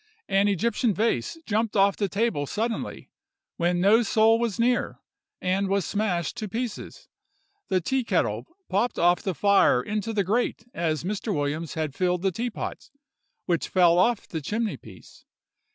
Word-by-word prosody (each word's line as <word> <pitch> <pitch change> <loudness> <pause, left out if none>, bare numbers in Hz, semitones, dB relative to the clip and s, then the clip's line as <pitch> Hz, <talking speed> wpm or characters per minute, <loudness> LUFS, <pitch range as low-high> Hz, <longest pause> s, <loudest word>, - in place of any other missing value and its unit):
An 195 +1 +3
Egyptian 220 +2 +1
vase 215 - 0
jumped 220 +1 -1
off 200 -1 +4
the 200 -2 -1
table 200 -8 0
suddenly, 225 - -3 0.5
when 175 +1 +1
no 205 +6 +5
soul 225 0 +3
was 235 -4 -2
near, 245 +1 +1 0.4
and 190 +2 0
was 195 -3 +1
smashed 195 -5 -1
to 215 -3 -4
pieces. 230 +2 -5 0.6
The 185 -2 +1
teakettle 260 +6 0 0.2
popped 220 +6 0
off 175 +1 +3
the 190 -3 -3
fire 200 -10 +4
into 210 - -3
the 210 -2 +1
grate 220 +3 -1
as 160 -2 -1
Mr. 210 +4 -3
Williams 150 0 -2
had 155 -3 -2
filled 180 +2 0
the 195 - +2
teapot, 235 +3 -5 0.6
which 175 -2 0
fell 175 -2 +4
off 230 +3 +2
the 160 - -4
chimney 215 +8 -2
piece. - - -15
200 Hz, 150 wpm, -26 LUFS, 175-225 Hz, 0.6 s, no